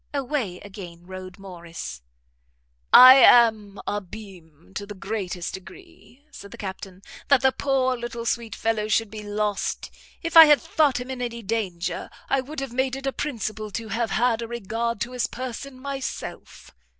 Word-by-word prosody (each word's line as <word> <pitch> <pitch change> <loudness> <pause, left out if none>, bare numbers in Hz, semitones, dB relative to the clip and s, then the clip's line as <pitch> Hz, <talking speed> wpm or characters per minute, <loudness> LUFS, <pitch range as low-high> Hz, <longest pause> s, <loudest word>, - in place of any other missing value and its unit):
Away 255 -9 -2
again 180 -4 -11
rode 185 0 -9
Morrice. 170 - -9 0.9
"I 255 +1 +11
am 220 -5 +5
abimé 190 -5 -8
to 205 - -6
the 205 - -8
greatest 190 -3 -4
degree," 290 - -13
said 200 - -11
the 235 - -11
Captain, 190 -2 -8 0.2
"that 280 -3 +4
the 265 0 +4
poor 260 -2 0
little 235 -1 -6
sweet 235 -2 -2
fellow 220 -1 -1
should 220 -1 +1
be 215 -1 -7
lost 210 0 -3 0.3
if 330 0 -4
I 325 -1 +12
had 295 -2 +6
thought 285 0 +1
him 250 +1 -6
in 255 -1 -5
any 235 -1 -4
danger, 190 -5 -3 0.2
I 275 - +3
would 280 +2 -7
have 270 -3 -6
made 260 +1 0
it 270 0 -7
a 270 - -1
principle 215 -6 -4
to 225 +2 -6
have 225 +2 -1
had 235 +2 +1
a 230 - -4
regard 235 0 -3
to 240 - -2
his 250 -1 -1
person 255 +1 -7
myself. 275 0 -7
225 Hz, 165 wpm, -24 LUFS, 195-255 Hz, 0.9 s, I